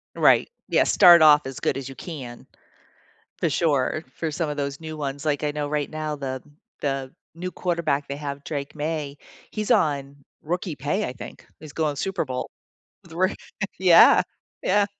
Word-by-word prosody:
Right. - - +4 0.2
Yeah, - - +4
start 175 -4 +7
off 150 -1 +7
as 135 -1 -6
good - - 0
as 135 -1 -6
you 135 - -9
can. 130 -9 -8 0.9
For 165 - +1
sure, 150 0 +1
for 160 - -3
some 160 +1 -2
of 150 - -3
those 140 0 -3
new 155 -1 -7
ones, 140 -1 -4
like, 145 -1 0
I 150 - 0
know 145 0 -3
right 150 -1 -2
now, 155 -1 -3
the 130 -2 -4 0.4
the 135 -2 -2 0.2
new 180 +2 -5
quarterback 170 -6 -1
they 140 - -4
have, 140 -1 -6
Drake 145 0 -5
Maye, 150 -2 -3 0.3
he's 215 -1 -4
on 140 -3 +1 0.3
rookie 175 0 -3
pay, 150 +10 -1
I - - -4
think. 120 - -11
He's 155 -1 -11
going 150 -2 -1
Super 190 +2 -1
Bowl 125 -1 -4 0.6
with 165 - -15
roo 185 +3 +2 0.5
Yeah, 180 -3 +7 0.4
yeah. 205 +1 +3
150 Hz, 175 wpm, -24 LUFS, 140-165 Hz, 0.9 s, start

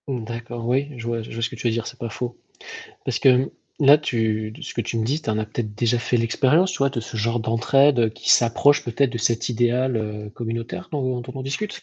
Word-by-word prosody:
Mmh 125 -4 -3
d'accord, 115 +1 -6
oui, 135 +4 +1
je 115 - -7
vois 115 -1 -1
je 110 - -10
vois 115 0 -4
ce 115 - +1
que - - -9
tu 120 - -2
veux 115 - +1
dire, 115 0 -2
c'est - - -8
pas 115 - -4
faux. 120 +3 -5 0.7
Parce - - -1
que 130 0 +4 0.3
là 145 +1 +7
tu 110 -6 -1
ce - - -7
que - - -1
tu 115 - -3
me 110 - 0
dis, 140 +7 0
tu - - -9
en 110 -1 +1
as 110 - 0
peut-être 110 -1 -5
déjà 120 +2 +1
fait 120 +1 0
l'expérience 130 +10 +3
tu - - -5
vois, 140 0 +2
de 130 -3 -3
ce 115 0 -8
genre 115 +2 0
d'entraide, 125 +5 +3
heu, 115 -1 +4
qui 110 - -2
s'approche 145 +5 +4
peut-être 125 +3 +1
de 120 - -4
cet 115 0 0
idéal, 125 +1 +1
heu, 105 -1 -4
communautaire 115 - -5
dont 130 -4 -1
dont 120 - -8
on 135 - -5
discute? 205 +11 -4
120 Hz, 255 wpm, -23 LUFS, 115-130 Hz, 0.7 s, là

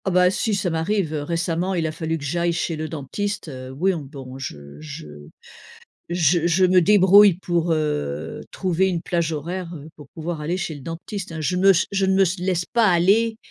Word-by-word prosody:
Ah - - +1
bah 180 0 +4
si 210 +2 0
ça 185 -2 -1
m'arrive, 165 +1 -1
heu, 150 - -2
récemment 170 +4 -1
il 165 -2 0
a 160 - -1
fallu 160 +1 -3
que 145 - -10
j'aille 170 +4 0
chez 165 0 -2
le 155 0 -4
dentiste, 180 +6 -4
heu. 130 -2 -8
Oui 175 +9 0
on 165 - -4
bon 135 -2 -10
je 70 - -8
je 75 - -10 0.8
je 170 -1 +2
je 175 +2 +3
me 185 0 +5
débrouille 200 +1 +6
pour, 175 -1 -1
heu, 75 - -3
trouver 185 0 0
une 170 -3 -2
plage 170 -2 -1
horaire, 170 +4 -4
heu, 155 0 -10
pour 150 -2 -13
pouvoir 165 0 -4
aller 160 +4 -2
chez 165 -3 -3
le 145 - -10
dentiste, 170 +5 -6
hein. 160 -1 -5
Je 180 +4 0
me 195 +1 +6
ch 170 - +1
je 195 -1 +1
ne 190 - +2
me 195 - +4
s 185 +1 -2
laisse 180 -1 -1
pas 230 +5 +2
aller, 205 +5 +3
170 Hz, 220 wpm, -22 LUFS, 155-185 Hz, 0.8 s, débrouille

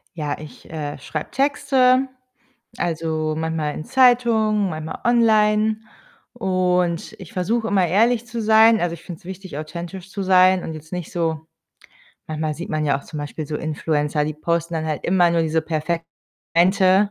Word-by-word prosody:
Ja, 150 -3 -3
ich, 150 -4 -12
äh, 150 -2 -5
schreibe 150 +2 -6
Texte, 265 -1 +3 0.7
also, 160 -2 -1
manchmal 160 -2 -2
in 155 - -6
Zeitungen, 235 -5 +3
manchmal 155 -1 -6
online, 220 -2 +3 0.5
und 180 -5 0
ich 185 -5 -11
versuche 225 +5 0
immer 190 -3 +2
ehrlich 230 +6 +2
zu 235 -1 -4
sein. 220 +1 +6
Also, 175 -1 0
ich 170 - -10
finde 170 -2 -8
es - - -24
wichtig, 190 -4 -8
authentisch 170 +4 -7
zu 200 +1 -4
sein 185 0 +5
und 160 - -5
jetzt 155 0 -11
nicht 180 -3 -5
so 160 -2 -2 0.8
Manchmal 155 0 -2
sieht 170 +4 -7
man 155 0 -1
ja 140 -1 +2
auch - - -14
zum 155 - -8
Beispiel 145 +1 -5
so 150 - -2
Influencer, 150 -1 -1
die 155 - -2
posten 170 +2 -2
dann 160 -1 -2
halt 155 -1 -3
immer 180 -1 +4
nur 170 -1 +2
diese 160 0 +1
perfekten 165 +1 -2 0.5
Momente. 190 +3 +4
175 Hz, 170 wpm, -21 LUFS, 155-210 Hz, 0.8 s, sein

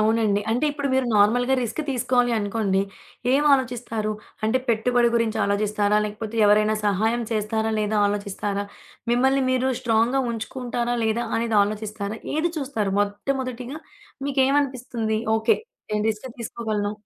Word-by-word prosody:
అవునండి. 215 -2 +2
అంటే, 245 +6 +1
ఇప్పుడు 285 -1 -2
మీరు 260 -1 +2
నార్మల్‌గా 245 +6 +4
రిస్క్ 235 +6 -3
తీసుకోవాలి 245 -1 +1
అనుకోండి, 205 -2 0 0.5
ఏవాలోచిస్తారు? 245 -6 +1 0.3
అంటే, 220 +4 +2
పెట్టుబడి 240 +1 +3
గురించి 225 -1 +1
ఆలోజిస్తారా? 205 0 +1
లేకపోతే 210 +1 -5
ఎవరైనా 210 +1 +4
సహాయం 220 +4 +1
చేస్తారా, 220 +1 0
లేదా 210 0 0
ఆలోచిస్తారా? 200 0 -2 0.5
మిమ్మల్ని 265 +3 +3
మీరు 255 0 +1
స్ట్రాంగ్‌గా 235 +2 +2
ఉంచుకుంటారా, 240 +1 -3
లేదా 220 +2 0
అనేది 230 -1 0
ఆలోచిస్తారా? 210 0 -4 0.2
ఏది 330 +2 +1
చూస్తారు 225 -9 -2
మొట్టమొదటిగా 255 +5 -3 0.5
మీకేమనిపిస్తుంది, 260 -5 0 0.2
ఓకే. 220 +1 +3 0.3
నేను 210 0 0
రిస్క్ 215 +4 -6
తీసుకోగలనా? 215 -3 -2
225 Hz, 120 wpm, -24 LUFS, 210-250 Hz, 0.5 s, నార్మల్‌గా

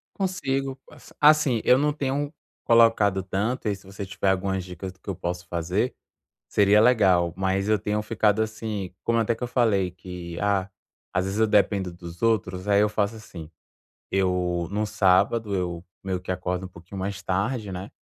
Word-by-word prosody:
Consigo. 135 -8 -2
As - - -16
assim, 150 -6 +5
eu 125 - +6
não 150 +2 +1
tenho 145 +1 -2 0.3
colocado 115 -5 +4
tanto 100 +8 -2
e 105 - +2
aí, 100 - 0
se 100 0 -17
você 100 +1 -7
tiver 95 +1 -1
algumas 95 0 -1
dicas 90 +1 -7
do 90 - -25
que - - -10
eu 95 - -2
posso 90 +1 -4
fazer, 90 +8 -1 0.5
seria 105 +1 +4
legal. 95 -8 +4
Mas 95 +1 0
eu 110 -1 +3
tenho 105 +2 -1
ficado, 110 -1 +2
assim, 110 -4 -4
como 115 0 +1
até 115 +1 +1
que 115 - -13
eu 125 - -1
falei 105 -7 +2
que, 90 -2 -8
ah, 100 -2 +1 0.4
às 90 +1 +1
vezes 95 +2 -3
eu 110 - +5
dependo 100 -3 +2
dos 85 0 -11
outros, 95 -5 0
aí 100 0 +5
eu 105 - +4
faço 105 +1 -1
assim, 85 -7 -10 0.6
eu 90 -3 0
num 105 +1 0
sábado 100 +2 +2
eu 90 -2 -2 0.2
meio 95 -2 -2
que 90 - -4
acordo 90 +1 -2
um - - -8
pouquinho 85 +2 -11
mais 100 0 -4
tarde, 100 +4 -1
né, 95 +1 -6
100 Hz, 185 wpm, -25 LUFS, 90-110 Hz, 0.6 s, eu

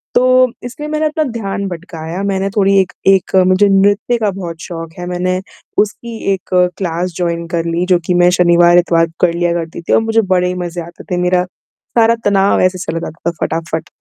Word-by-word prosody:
तो 255 0 +4
इसलिए 295 +5 -6
मैंने 310 0 -1
अपना 305 +1 0
ध्यान 200 -3 -3
भटकाया 170 0 -6
मैंने 195 0 -1
थोड़ी 195 -1 +2
एक 190 - 0 0.2
एक 195 -1 +3
मुझे 185 +2 +4
नृत्य 205 +5 +2
का 215 -3 0
बहुत 170 -4 -7
शौक 165 -1 -7
है 175 - -5
मैंने 185 +1 -1 0.4
उसकी 225 +2 -2 0.2
एक 190 - -7 0.3
क्लास 180 -1 -2
जॉइन 170 -1 -2
कर 165 - -1
ली। 170 +1 -1
जो 180 - +4
कि 180 - +1
मैं 175 0 +4
शनिवार, 175 0 +5
इतवार 165 -1 +3
को 170 +2 0
कर 170 - -3
लिया 175 0 0
करती 170 0 -4
थी 170 - -1
और - - +5
मुझे 225 0 +2
बड़े 180 0 +2
ही 180 - -1
मज़ा 175 -1 -5
आता 170 - -13
था। 180 - 0
मेरा 180 0 +2 0.5
सारा 230 0 +5
तनाव 200 -1 +3
ऐसे 185 0 +2
चला 165 -1 -3
जाता 165 +1 -4
था 165 - -3
फटाफट। 160 0 -4
180 Hz, 205 wpm, -15 LUFS, 170-200 Hz, 0.5 s, शनिवार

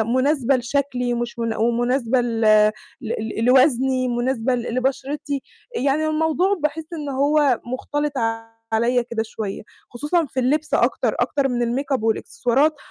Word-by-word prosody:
مناسبة 270 0 +2
لشكلي 250 -1 -1
ومش 240 0 -4
منا 230 -1 -2
ومناسبة 240 +2 +1
ل 230 -2 -2
ل 215 -1 +5 0.3
ل 225 -1 -3
لوزني 255 0 +3
مناسبة 245 0 0
ل 235 -1 -4
لبشرتي، 275 +2 -2 0.3
يعني 285 - +1
الموضوع 320 +5 +1
باحس 305 +1 -1
إن 300 -3 -5
هو 280 -1 +2
مختلط 290 +4 -3 0.6
عليَّ 240 +2 +2
كده 230 -2 -3
شويّة، 215 -2 -6 0.3
خصوصًا 295 +7 0
في 265 -1 -4
اللبس 295 +4 0
أكتر، 240 -2 +1
أكتر 270 +3 +1
من 240 -2 -1
الmake 275 -1 0
up - - -8
والإكسسوارات 275 - +1
255 Hz, 140 wpm, -22 LUFS, 235-285 Hz, 0.6 s, ل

